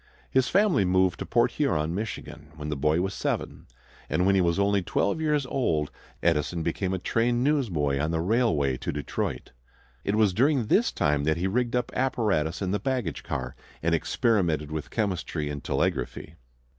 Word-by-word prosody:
His 130 -1 +3
family 195 - +3
moved 95 -1 +2
to - - -5
Port - - +3
Huron, 75 +2 0
Michigan, 90 -6 -6
when 75 -1 -6
the 75 - -1
boy 75 +4 +2
was 95 +1 -2
seven, - - -3 0.4
and 90 - +1
when 100 - +4
he 95 - +4
was 85 0 +1
only 100 0 +2
twelve 100 - 0
years 150 -3 +1
old 80 - 0 0.3
Edison 85 0 +1
became 90 +3 -1
a 95 - 0
train 120 +6 +1
newsboy 90 - +1
on 75 +2 0
the 80 0 0
railway 80 - +1
to - - -3
Detroit. 75 -2 -4 0.5
It 100 - 0
was 105 -4 +3
during 130 +3 +2
this 215 - +3
time 75 -1 +1
that 80 +1 +2
he 90 - -1
rigged 120 +5 0
up 125 - -1
apparatus 100 -10 0
in 95 - -1
the 105 - 0
baggage 125 - -2
car 65 -3 -4 0.3
and 85 +1 +2
experimented 85 - +1
with 80 -1 -4
chemistry 90 -8 -2
and 70 -1 -6
telegraphy. 75 - -2
95 Hz, 180 wpm, -27 LUFS, 75-115 Hz, 0.5 s, when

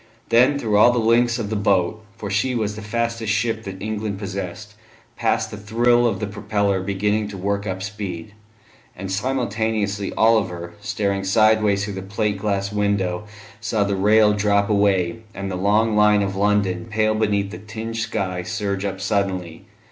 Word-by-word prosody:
Then 125 +5 +5
through 110 -6 +1
all 120 - +7
the 120 - -1
length 115 +1 +3
of 110 -3 -4
the - - 0
boat 100 +1 +1
for 100 -2 -5
she 125 +6 +1
was 105 -3 -1
the 110 - -7
fastest 115 0 -2
ship 110 +1 -1
that 95 -1 -7
England 105 -1 -3
possessed 100 +1 -6 0.4
passed - - 0
the 105 - -6
thrill 120 +3 +2
of 115 - -1
the 105 - -2
propeller 100 -1 -1
beginning 105 +2 0
to 100 -1 -7
work 100 +2 -2
up 95 0 -3
speed; 100 -2 -6 0.6
and 95 +1 -6
simultaneously 110 -3 -1
Oliver, 95 -7 +2
staring 100 -1 -1
sideways 105 0 +3
through 100 - -5
the 95 - -5
plate 100 +1 -2
glass 100 -1 -1
window, 100 -2 0 0.3
saw 110 -1 0
the 100 0 -1
rail 105 +2 +4
drop 100 0 +2
away, 100 -2 +2 0.2
and 100 -1 -4
the - - -3
long 105 +4 +2
line 105 -1 +4
of 95 -1 -3
London, 100 -1 +1
pale 110 0 +1
beneath 100 -2 0
the - - -7
tinged 110 +2 -6
sky, 95 -5 -2
surge 100 +1 -3
up 95 -1 -3
suddenly. 95 -4 -2
105 Hz, 170 wpm, -22 LUFS, 100-110 Hz, 0.6 s, all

